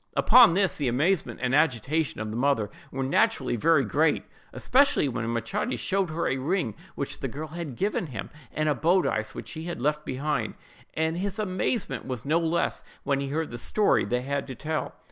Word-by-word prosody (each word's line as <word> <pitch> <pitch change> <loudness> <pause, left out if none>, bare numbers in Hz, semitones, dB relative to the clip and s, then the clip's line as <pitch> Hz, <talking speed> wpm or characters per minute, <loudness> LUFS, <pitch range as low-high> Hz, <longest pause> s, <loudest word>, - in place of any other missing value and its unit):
Upon 240 -9 +7
this, 195 -2 +2
the 145 - -1
amazement 130 - 0
and 125 +1 +1
agitation 150 +1 +1
of 110 -1 -4
the - - -5
mother 125 -4 +1 0.2
were 135 0 -3
naturally 130 -1 +2
very 140 +3 +3
great; 150 +7 +2 0.3
especially 275 - +3
when 120 -3 -3
Machates 195 - -2
showed 195 -2 0
her 160 +2 -2
a 135 - 0
ring 145 - -1 0.2
which - - -4
the - - -2
girl 155 +2 -6
had 160 -5 -6
given 195 - -1
him, 115 -8 -6 0.2
and 155 +1 -1
a 150 - +3
bodice 160 - +1
which - - -6
she 160 -1 -6
had 175 -5 -4
left 150 +4 0
behind 145 +3 -2
her; - - -30 0.4
and 160 +1 0
his 200 +2 -3
amazement 205 +1 -2
was 125 -2 -4
no 155 +4 +3
less, 165 0 0 0.2
when 140 -1 +1
he 140 - -2
heard 155 +1 -2
the 120 - -5
story 210 - +2
they 125 +5 -1
had 140 +1 -2
to 130 - -6
tell. 155 +4 -3
150 Hz, 200 wpm, -27 LUFS, 130-170 Hz, 0.4 s, Upon